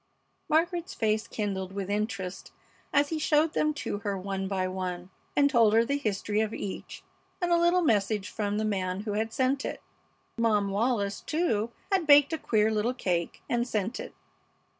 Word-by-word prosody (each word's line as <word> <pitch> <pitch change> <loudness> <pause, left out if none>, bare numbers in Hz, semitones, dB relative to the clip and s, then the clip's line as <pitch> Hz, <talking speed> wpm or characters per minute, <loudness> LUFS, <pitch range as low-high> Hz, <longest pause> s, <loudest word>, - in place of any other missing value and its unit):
Margaret's 340 +2 +1
face 220 0 0
kindled 195 -4 -3
with 195 -1 -3
interest 200 -3 -3 0.4
as 285 0 +3
he 320 - -2
showed 305 +1 +2
them 305 - +2
to 205 - -2
her 200 -1 -2
one 195 0 -3
by 190 -1 -1
one, 185 -1 -4 0.2
and 285 - +5
told 230 -6 +4
her 230 +1 +5
the 280 +3 0
history 210 -2 -1
of 220 0 -2
each 195 - -6 0.4
and 350 -2 0
a - - +6
little 345 +1 +3
message 205 -5 +1
from 205 -1 -2
the 215 - 0
man 190 -2 -1
who 210 0 -4
had 220 +2 -1
sent 265 +3 +1
it. - - -4 0.6
Mom 210 -3 +2
Wallis, 205 -1 0
too, 235 -10 0 0.2
had 375 -5 +2
baked 290 +1 +7
a 320 - -1
queer 220 -3 +2
little 220 +4 0
cake 175 -8 -2
and 240 0 0
sent 215 0 -2
it. - - -8
215 Hz, 180 wpm, -28 LUFS, 200-280 Hz, 0.6 s, baked